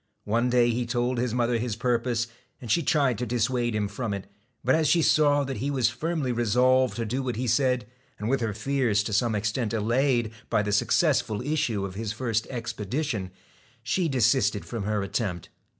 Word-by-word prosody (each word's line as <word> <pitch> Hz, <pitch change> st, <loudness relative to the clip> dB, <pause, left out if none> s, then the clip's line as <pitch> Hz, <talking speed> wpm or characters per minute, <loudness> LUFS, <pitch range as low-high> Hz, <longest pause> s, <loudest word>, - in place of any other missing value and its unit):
One 115 Hz, +4 st, +1 dB
day 120 Hz, -1 st, +4 dB
he 120 Hz, +1 st, -2 dB
told 120 Hz, +1 st, 0 dB
his 125 Hz, -1 st, 0 dB
mother 120 Hz, -1 st, +1 dB
his 115 Hz, -2 st, -2 dB
purpose, 120 Hz, 0 st, 0 dB, 0.3 s
and 120 Hz, -4 st, -5 dB
she 170 Hz, -, +3 dB
tried 140 Hz, -7 st, +1 dB
to 125 Hz, -, -1 dB
dissuade 120 Hz, 0 st, 0 dB
him 105 Hz, -1 st, 0 dB
from 100 Hz, +1 st, -3 dB
it, 100 Hz, -, -7 dB, 0.4 s
but 130 Hz, -, +3 dB
as 160 Hz, -1 st, +3 dB
she 165 Hz, +3 st, +4 dB
saw 145 Hz, -2 st, +4 dB
that 135 Hz, -1 st, -4 dB
he 135 Hz, +7 st, -2 dB
was 130 Hz, -4 st, +2 dB
firmly 155 Hz, -2 st, -2 dB
resolved 125 Hz, +2 st, +3 dB
to 115 Hz, -, -2 dB
do 125 Hz, +5 st, -2 dB
what 125 Hz, -2 st, -3 dB
he 125 Hz, +3 st, -2 dB
said, 125 Hz, 0 st, +2 dB, 0.3 s
and 105 Hz, -, -4 dB
with 135 Hz, +1 st, +1 dB
her 115 Hz, -2 st, 0 dB
fears 110 Hz, -1 st, 0 dB
to 105 Hz, -, -4 dB
some 110 Hz, +2 st, +2 dB
extent 110 Hz, +2 st, -1 dB
allayed 120 Hz, +1 st, +1 dB, 0.2 s
by 105 Hz, -, +2 dB
the 105 Hz, -, -2 dB
successful 115 Hz, 0 st, +2 dB
issue 135 Hz, -9 st, 0 dB
of 95 Hz, -, -6 dB
his 110 Hz, +2 st, -4 dB
first 115 Hz, -2 st, -1 dB
expedition, 115 Hz, -2 st, -3 dB, 0.5 s
she 165 Hz, +9 st, 0 dB
desisted 125 Hz, -4 st, +2 dB
from 115 Hz, -5 st, -5 dB
her 105 Hz, -1 st, 0 dB
attempt. 100 Hz, -3 st, -3 dB
120 Hz, 195 wpm, -26 LUFS, 110-130 Hz, 0.5 s, day